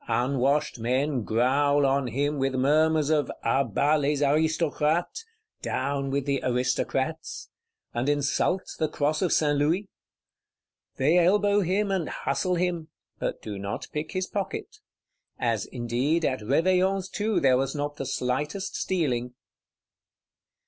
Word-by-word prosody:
Unwashed 130 +3 +1
men 130 +3 0
growl 140 +6 +2
on 135 -1 +1
him, 140 +5 -1
with 135 0 0
murmurs 155 +3 +3
of 150 -3 +1
'À 135 -4 +1
bas 150 +8 +3
les 145 +1 +1
Aristocrates 160 - +1 0.4
(Down 135 +1 -2
with 140 0 -1
the 140 -2 0
Aristocrats);' 130 +5 -1 0.4
and 120 +4 -1
insult 145 +6 +1 0.2
the 155 - +2
cross 150 +1 0
of 185 - +1
St. 145 -1 +3
Louis? 165 +8 +1 1.1
They 155 +7 +3
elbow 205 +3 +3
him, 195 +3 0
and 185 -5 -1
hustle 180 -1 -1
him; 175 -2 -1 0.3
but - - -3
do 105 -2 -5
not 100 0 -5
pick 150 +1 -4
his 185 0 -1
pocket;—as 420 - -5
indeed 130 +7 0
at 130 -1 0
Réveillon's 185 - +2
too 210 +1 0
there 130 -2 +4
was 135 +2 -1
not 145 0 -3
the 135 - -4
slightest 150 +10 -2
stealing. 125 -9 -1
145 Hz, 130 wpm, -26 LUFS, 130-170 Hz, 1.1 s, there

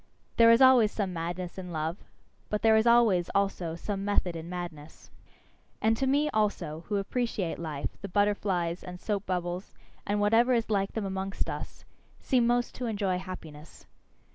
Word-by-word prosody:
There 230 0 +7
is 230 +3 +7
always 250 -5 +6
some 195 -4 -2
madness 175 +2 -4
in 180 -1 -7
love. 160 +2 -2 0.5
But 210 - -2
there 220 -1 +6
is 220 +2 +3
always, 225 -7 +4
also, 190 -4 0
some 195 +3 -4
method 200 -4 0
in 165 +1 -7
madness. 170 -4 -8 0.7
And 220 +1 +2
to 265 +4 -1
me 290 +3 +2
also, 200 -7 -1
who 210 - -1
appreciate 200 -3 -2
life, 155 -4 -5
the 200 - -6
butterflies, 190 -3 0
and 180 0 -8
soap 205 +1 -3
bubbles, 180 0 -3 0.3
and 205 +1 0
whatever 225 +5 +4
is 230 -1 -1
like 195 -1 0
them 220 -3 -2
amongst 190 0 -3
us, - - -8 0.3
seem 245 -3 +2
most 240 0 +1
to 250 - -3
enjoy 200 -4 -1
happiness. 165 -5 -10
195 Hz, 165 wpm, -29 LUFS, 175-220 Hz, 0.7 s, There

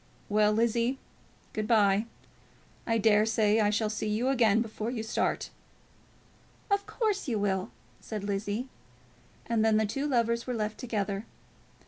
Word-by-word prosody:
"Well, 210 0 +4
Lizzie, 235 +3 +1 0.6
good 215 -1 -2
bye. 210 -1 +3 0.8
I 230 -1 +2
dare 210 -1 +4
say 220 -1 +2
I 210 -1 +3
shall 210 +1 0
see 215 0 -2
you 225 +5 0
again 230 -4 +3
before 220 0 -5
you 235 -3 -3
start." 225 - -1 1.2
"Of 400 0 +1
course 425 -7 -1
you 235 -4 0
will," 195 0 0 0.3
said 215 -3 -6
Lizzie. 205 +4 -2 0.8
And 230 -2 +1
then 220 -1 +4
the 220 - +2
two 275 +8 -2
lovers 235 -3 +1
were 250 - -2
left 215 -1 -3
together. 205 -4 -2
220 Hz, 145 wpm, -29 LUFS, 210-235 Hz, 1.2 s, Well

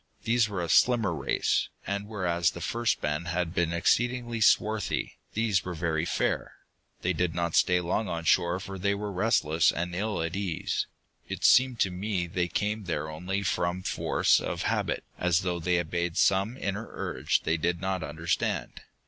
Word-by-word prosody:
These 115 -1 +2
were 95 -4 -3
a - - -2
slimmer 115 0 +4
race, 70 -5 0 0.2
and 100 +1 -3
whereas 85 -5 +1
the 85 - -8
first 115 +6 0
band 75 +3 -2
had 85 -1 -1
been 85 -2 +1
exceedingly 120 +6 +1
swarthy, 110 0 +2 0.2
these 105 -6 +1
were 90 -1 -5
very 80 -1 -1
fair. - - -1 0.5
They 90 - +1
did 90 0 -1
not 85 -1 -1
stay 90 -1 +4
long 95 +5 -1
on 85 -2 -3
shore, 85 +2 +2
for 95 -1 -7
they 100 +2 +1
were 105 0 -4
restless 90 -5 +2
and 90 +1 -3
ill 105 -1 -1
at 85 +2 -3
ease. 95 -5 -2 0.4
It - - -5
seemed 130 -2 +5
to 95 - +2
me 95 0 -2
they 90 +1 -1
came 105 +3 -2
there 80 -2 -2
only 95 +5 -3
from 90 0 -1
force - - +2
of - - -3
habit, - - -1 0.2
as 90 0 +2
though 90 -2 -2
they 90 +1 +1
obeyed 85 0 -2
some 100 +6 +2
inner 100 -1 -3
urge - - -1
they 80 +1 +1
did 85 +2 0
not 95 0 -2
understand. 80 +3 -2
90 Hz, 175 wpm, -28 LUFS, 85-105 Hz, 0.5 s, seemed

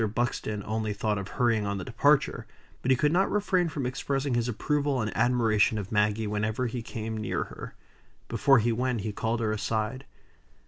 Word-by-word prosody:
Buxton 110 -3 -1
only 110 0 -2
thought 105 0 -1
of 95 - -5
hurrying 115 -2 +1
on 100 0 -1
the 95 - -4
departure; - - +2 0.3
but 130 - -2
he 130 - +5
could 150 +2 +2
not 190 +3 +3
refrain 185 -4 +1
from 145 -4 -3
expressing 135 +1 -1
his 120 0 +1
approval 140 +3 0
and 110 -2 -2
admiration 110 -4 +3
of 100 -2 -5
Maggie 105 +1 +2
whenever 105 +4 -1
he 120 0 -3
came 110 0 -5
near 110 - -1
her. - - -10 0.5
Before 135 -2 +4
he 115 +1 +2
went, 125 0 -1
he 105 +1 -3
called 115 +3 -2
her 110 -1 0
aside. 110 +4 -2
115 Hz, 185 wpm, -28 LUFS, 105-130 Hz, 0.5 s, he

